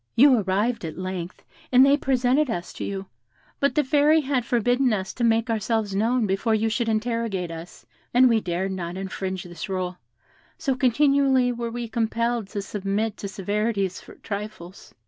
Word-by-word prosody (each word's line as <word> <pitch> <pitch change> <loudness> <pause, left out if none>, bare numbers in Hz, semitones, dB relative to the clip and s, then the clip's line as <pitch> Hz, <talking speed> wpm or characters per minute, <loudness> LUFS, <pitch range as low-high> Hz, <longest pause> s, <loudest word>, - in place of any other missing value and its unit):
You 260 -1 +6
arrived 205 +4 0
at 160 -1 -6
length, 185 -1 -5 0.3
and 255 +1 +7
they 275 +1 +5
presented 265 +1 +1
us 175 -6 -4
to - - -6
you; 195 -1 -4 0.5
but 280 - +1
the 300 - +3
Fairy 295 +3 +4
had 265 -3 0
forbidden 245 +2 +2
us 190 -2 -3
to 245 - -3
make 230 0 +3
ourselves 220 -2 -1
known 225 +4 +1
before 205 +3 +1
you 220 +1 +1
should 230 +1 -1
interrogate 220 -5 -1
us, 165 +1 -10 0.3
and 255 +1 +6
we 230 -2 +3
dared 185 +1 -2
not 180 -1 -4
infringe 190 -1 -4
this 175 +2 -8
rule, 185 -1 -3 0.6
so 275 -4 0
continually 265 0 +3
were 235 -1 -3
we 240 0 -4
compelled 230 0 -1
to 200 -1 -4
submit 205 +2 -2
to 200 - -5
severities 200 0 -2
for - - -14
trifles. 200 -3 -8
225 Hz, 170 wpm, -24 LUFS, 190-245 Hz, 0.6 s, and